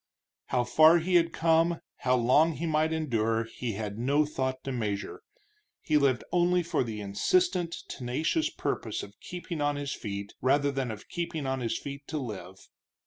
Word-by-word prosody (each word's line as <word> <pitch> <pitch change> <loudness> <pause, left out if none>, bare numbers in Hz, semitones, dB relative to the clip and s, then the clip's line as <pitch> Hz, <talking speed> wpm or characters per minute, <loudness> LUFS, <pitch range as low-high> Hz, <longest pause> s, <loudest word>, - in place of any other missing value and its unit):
How 125 - +1
far 155 +7 +6
he 175 +2 -1
had 170 -1 +4
come, 165 +1 +2 0.2
how 130 -1 +2
long 130 +7 +4
he 170 - -4
might 155 0 +1
yet 160 - 0
endure, 115 -5 +1
he 115 0 -5
had 105 +1 -5
no 140 +5 +3
thought 130 -3 -3
to 135 - -4
measure. 105 -5 -3 0.6
He 155 - -1
lived 140 -4 +3
only 175 0 +3
for 165 -4 0
the 110 -3 -5
insistent, 175 - +1
tenacious 150 - -1
purpose - - -3
of - - -10
keeping 175 -3 -6
on 145 0 +1
his 145 0 -3
feet, 100 -2 -6
rather 140 +2 +3
than 135 -2 -2
of 110 -1 -7
keeping 170 -4 -3
on 130 0 -1
his 115 -2 -1
feet 140 0 -8
to 155 - -3
live. 95 -8 -7
140 Hz, 180 wpm, -29 LUFS, 120-160 Hz, 0.6 s, far